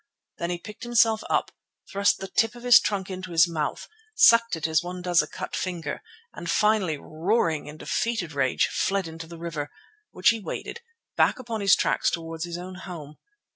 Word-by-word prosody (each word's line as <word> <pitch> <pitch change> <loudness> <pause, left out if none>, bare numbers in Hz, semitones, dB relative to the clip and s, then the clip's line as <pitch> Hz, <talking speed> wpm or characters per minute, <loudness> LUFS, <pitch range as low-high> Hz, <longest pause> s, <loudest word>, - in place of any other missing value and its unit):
Then 170 - -2
he 175 - -1
picked 210 +4 -11
himself 230 -2 +3
up, - - +1 0.4
thrust 200 +1 +2
the 195 - -6
tip 225 +4 +1
of 240 - -12
his 245 -1 +8
trunk 195 -2 -2
into 185 0 -6
his 165 +1 +6
mouth, 155 -3 -3 0.3
sucked 230 -3 +6
it 160 - -4
as 160 -1 +2
one 180 0 -6
does 175 -1 +4
a 150 - -5
cut - - -6
finger, 170 -5 -4 0.3
and - - -7
finally, 210 -7 +2
roaring 160 +1 -1
in 150 +1 -9
defeated 205 -4 -2
rage, 130 -3 +2
fled 195 -2 -1
into 160 0 -8
the 170 0 -10
river, 160 -3 -5 0.4
which 185 - +3
he 225 0 +1
waded, 215 - -6
and 460 -1 -29
back - - +4
upon 230 -4 -5
his 195 -1 +6
tracks - - +1
towards 165 0 -4
his 170 0 -5
own 180 +1 -7 0.2
home. 150 -4 -9
180 Hz, 195 wpm, -26 LUFS, 165-215 Hz, 0.4 s, his